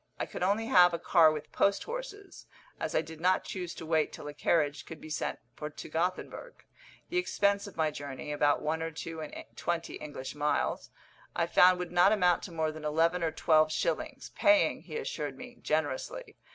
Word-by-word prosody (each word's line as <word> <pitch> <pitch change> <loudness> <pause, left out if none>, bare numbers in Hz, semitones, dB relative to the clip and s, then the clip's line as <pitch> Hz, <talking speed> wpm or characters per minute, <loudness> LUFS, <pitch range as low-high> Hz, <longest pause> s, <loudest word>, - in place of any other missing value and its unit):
I - - -2
could - - -8
only 200 +5 +1
have 180 -7 +6
a - - -2
car 165 -2 +5
with 155 -1 -6
post 200 0 +2
horses, 465 -5 -8 0.3
as - - -3
I 155 - +3
did 160 0 -11
not 185 +2 +3
choose 180 -3 -5
to 165 - -8
wait 160 -1 +1
till - - -9
a 145 - -6
carriage 150 -1 0
could 160 - -9
be 155 - -10
sent - - -2 0.2
for 150 - -5
to 145 - -10
Gothenburg. 180 - -3 0.5
The 355 - -2
expense 200 - +1
of 200 - -12
my 155 -1 +1
journey 145 0 -6
(about 145 0 +2
one 160 +1 -1
or 165 - -2
two 160 +1 -7
and 155 - -7
twenty 170 -1 -3
English 145 -3 -7
miles) 150 0 -1 0.5
I 170 - +2
found 180 +2 +6
would 180 -1 -5
not 180 +3 +5
amount 180 -5 +3
to 185 - -9
more 160 -2 -1
than 155 0 -10
eleven 165 +4 +2
or 165 - +1
twelve 155 -1 +3
shillings, - - -2
paying, 305 0 +3
he - - -7
assured 470 +1 -4
me, 250 -1 -10
generously. 150 -4 -2
165 Hz, 200 wpm, -30 LUFS, 155-190 Hz, 0.5 s, have